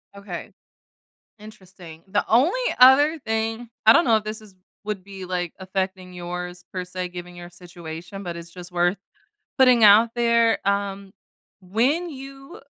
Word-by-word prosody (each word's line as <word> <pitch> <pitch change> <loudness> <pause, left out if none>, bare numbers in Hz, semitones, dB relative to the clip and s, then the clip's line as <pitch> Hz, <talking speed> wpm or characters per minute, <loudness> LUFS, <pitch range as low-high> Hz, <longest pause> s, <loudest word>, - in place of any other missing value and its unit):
Okay. 200 -4 -8 0.9
Interesting. 185 -6 -14
The 205 +2 0
only 290 - +3 0.2
other 285 +5 +6
thing 225 +1 -2 0.2
I 220 - +10
don't 345 - +4
know 230 -2 +4
if 215 - -3
this 215 +1 -6
is 210 -3 -17 0.3
would 205 -3 -5
be, 195 -1 -9
like, 180 -2 -3
affecting 185 -1 -4
yours, 180 0 -7
per 185 -1 -4
se, 180 0 -5
given 175 0 -9
your 175 0 -10
situation, 175 +2 -10
but 170 -1 -5
it's 170 0 -10
just 180 0 -10
worth 175 +2 +1 0.6
putting 255 -4 +5
out 215 +3 +7
there, 235 -1 +3
um, 200 -1 -2 0.5
when 240 - 0
you 270 0 -11
195 Hz, 150 wpm, -23 LUFS, 180-225 Hz, 0.9 s, I